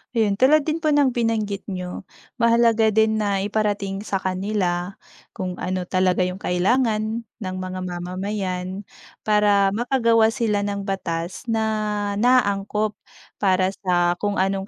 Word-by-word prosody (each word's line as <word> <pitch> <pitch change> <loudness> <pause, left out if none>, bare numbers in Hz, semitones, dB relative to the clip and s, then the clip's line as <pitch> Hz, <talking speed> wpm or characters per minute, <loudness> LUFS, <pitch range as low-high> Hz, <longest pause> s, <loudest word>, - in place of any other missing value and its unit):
Ayon, 215 -3 +2
tulad 280 +6 +4
din 320 +1 -1
po 310 - +3
ng 285 -3 +4
binanggit 220 -4 -1
niyo, 180 -1 -5 0.4
mahalaga 230 -1 +4
din 220 +1 +3
na 200 -2 0
iparating 205 -2 -1
sa 195 -2 -2
kanila, 185 -1 -2 0.4
kung 185 -1 -5
ano 185 0 -2
talaga 185 0 +2
'yong 185 +2 -5
kailangan 220 +4 +1
ng 190 -4 -7
mga 185 0 -5
mamamayan 185 +1 -4 0.4
para 205 -2 +3
makagawa 230 -1 +3
sila 220 -5 0
ng 200 -1 -3
batas 185 -1 -4
na 215 -2 -1
naangkop 210 -3 +2 0.5
para 185 -1 +2
sa 175 -1 +2
kung 205 -1 -1
anong 195 +1 0
205 Hz, 130 wpm, -22 LUFS, 185-220 Hz, 0.5 s, tulad